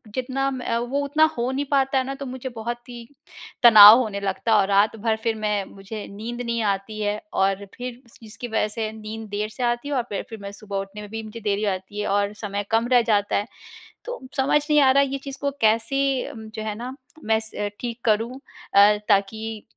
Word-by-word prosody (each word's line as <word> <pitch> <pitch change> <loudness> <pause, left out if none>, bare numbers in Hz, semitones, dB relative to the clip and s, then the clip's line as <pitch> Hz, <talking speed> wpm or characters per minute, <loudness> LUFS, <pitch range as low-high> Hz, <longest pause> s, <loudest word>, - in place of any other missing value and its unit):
जितना 265 +2 -1
मैं 260 -2 -6
अ, 230 - +1
वो 245 +4 -2
उतना 300 +3 +2
हो 240 +2 0
नहीं 275 +2 -2
पाता 270 -1 +2
है 260 - +2
ना 270 - -4
तो 275 - -7
मुझे 260 0 -6
बहुत 240 +2 -5
ही 235 -1 -9 0.6
तनाव 215 -1 +11
होने 215 -5 -2
लगता 200 +3 0
और 195 -1 +3
रात 205 +2 +3
भर 220 +1 0
फिर 225 -1 0
मैं 210 -2 -1
मुझे 200 +3 -8
नींद 230 +4 -6
नहीं 235 -1 -2
आती 200 +1 -2
है। 205 0 -1
और 195 +1 +1
फिर 250 0 -7
इस 235 - -19
इसकी 220 +3 -8
वजह 220 -2 0
से 215 0 -3
नींद 220 0 -8
देर 210 +1 -2
से 250 +3 -6
आती 240 +3 0
है - - -2
और 245 - +1
फिर, 200 - -3
फिर 225 - -8
मैं 200 - -6
सुबह 200 -1 -6
उठने 195 +2 -6
में 210 - -9
भी 225 0 -5
मुझे 215 +1 -9
देरी 205 0 -1
हो 205 - +2
जाती 190 +2 -6
है, - - -2
और 200 +1 +1
समय 205 -1 -4
कम 225 +1 +2
रह 245 - +7
जाता 205 -1 +1
है। 205 - -1 0.6
तो - - -5 0.2
समझ 275 +2 +3
नहीं 300 0 +5
आ 265 -1 +6
रहा 280 +1 +5
ये 275 0 -2
चीज़ 275 -1 -7
को 280 - 0
कैसे 255 +5 +1
जो 220 -1 -8
है 215 -1 -3
ना 245 +4 -6 0.3
मैं 220 0 +3
स 205 -1 -3
ठीक 240 -1 -4
करूँ 230 +4 +1 0.4
अ, 205 +1 +7
ताकि 220 +2 0
220 Hz, 230 wpm, -23 LUFS, 210-245 Hz, 0.6 s, तनाव